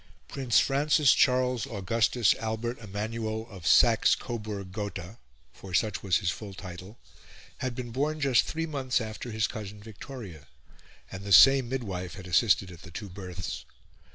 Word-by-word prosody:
Prince 130 -4 +2
Francis 145 +1 +3
Charles 125 -2 +2
Augustus 115 0 +2
Albert 110 +2 -3
Emmanuel 110 +1 -4
of 90 -4 -7
Saxe 115 -3 +5
Coburg 105 -5 -6
Gotha 100 0 -6 0.3
for 95 -2 -7
such 105 0 +1
was 95 -3 +2
his 85 -3 -1
full 100 +1 -8
title 90 +3 -9 0.6
had 130 -2 -3
been 120 -2 -6
born 150 +5 -1
just 135 -4 +3
three 165 +1 -3
months 135 -5 -1
after 110 +1 -6
his 110 -1 0
cousin 105 -1 -6
Victoria, 105 - -10 0.6
and 95 +1 -7
the 100 - -6
same 125 +8 +8
midwife 100 -9 -4
had 95 -3 -10
assisted 95 0 +2
at 85 - -12
the 90 - -12
two 100 +4 -7
births. 90 -9 -6
110 Hz, 155 wpm, -28 LUFS, 95-125 Hz, 0.6 s, same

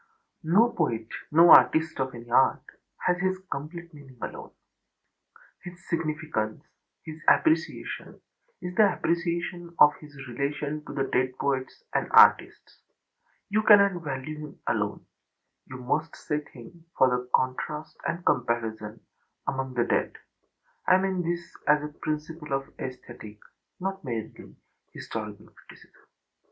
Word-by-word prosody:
No 225 +6 +6
poet, 115 - -1 0.2
no 165 +3 +7
artist 155 +5 +6
of 130 -1 -2
any 120 0 -10
art, 130 +2 +4 0.4
has 180 0 +2
his 185 0 0
complete 170 +4 -6
meaning 135 -4 -14
alone. - - -7 1.1
His 175 0 -11
significance, 155 -9 -2 0.4
his 155 0 -9
appreciation 320 0 +1 0.4
is 180 0 -4
the 200 -1 +4
appreciation 170 0 -2
of 150 0 +7
his 150 -2 -14
relation 145 +4 -3
to - - -8
the 135 - 0
dead 130 -1 0
poets 135 -2 -2
and - - 0
artists. - - +5 0.7
You 215 +2 +3
cannot 200 -4 +6
value 145 +1 -5
him 150 -1 -10
alone; - - -2 0.6
you 130 - -8
must 150 +6 -2
set 150 0 -4
him, 150 +8 -14
for 125 -1 +2
contrast 150 +4 -3
and 170 +1 -3
comparison, 115 -3 -1 0.5
among 130 -1 -3
the 120 - +2
dead. - - 0 0.7
I 185 - +7
mean 190 -1 0
this 170 0 -4
as 150 0 +4
a 150 0 -6
principle 155 -1 -4
of 135 0 -3
aesthetic, 120 -4 -8 0.4
not 195 0 -4
merely 115 -5 -6 0.4
historical, - - -7
criticism. - - -19
150 Hz, 125 wpm, -27 LUFS, 130-170 Hz, 1.1 s, no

